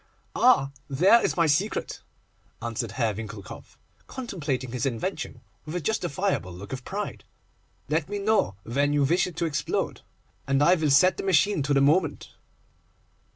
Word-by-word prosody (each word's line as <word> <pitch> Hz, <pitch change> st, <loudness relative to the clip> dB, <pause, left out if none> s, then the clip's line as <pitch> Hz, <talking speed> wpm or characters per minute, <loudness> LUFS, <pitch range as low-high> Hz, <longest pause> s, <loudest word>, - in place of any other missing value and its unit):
'Ah! 140 Hz, -, +4 dB, 0.2 s
there 185 Hz, -, +5 dB
is -, -, 0 dB
my 170 Hz, -, +4 dB
secret,' 160 Hz, +8 st, 0 dB, 0.6 s
answered 115 Hz, -2 st, -4 dB
Herr 110 Hz, 0 st, 0 dB
Winckelkopf, 105 Hz, -2 st, -9 dB, 0.3 s
contemplating 150 Hz, -, -4 dB
his 125 Hz, +1 st, -1 dB
invention 115 Hz, -4 st, -4 dB, 0.2 s
with 155 Hz, -, -7 dB
a -, -, 0 dB
justifiable 175 Hz, -, -1 dB
look 95 Hz, +7 st, -9 dB
of 130 Hz, -1 st, -6 dB
pride; -, -, -5 dB, 0.6 s
'let 155 Hz, +2 st, -1 dB
me 205 Hz, -, -3 dB
know 200 Hz, -, +1 dB
when 140 Hz, +5 st, 0 dB
you 145 Hz, -1 st, +3 dB
wish 170 Hz, +7 st, +2 dB
it 180 Hz, -, -8 dB
to 170 Hz, -, -1 dB
explode, 145 Hz, -3 st, -2 dB, 0.5 s
and 135 Hz, +1 st, +2 dB
I 175 Hz, -, +6 dB
will 160 Hz, -4 st, +1 dB
set 150 Hz, +7 st, +5 dB
the -, -, -4 dB
machine 190 Hz, -1 st, +3 dB
to 140 Hz, +1 st, 0 dB
the 135 Hz, -, +4 dB
moment. 155 Hz, +3 st, +1 dB
145 Hz, 155 wpm, -26 LUFS, 130-180 Hz, 0.6 s, I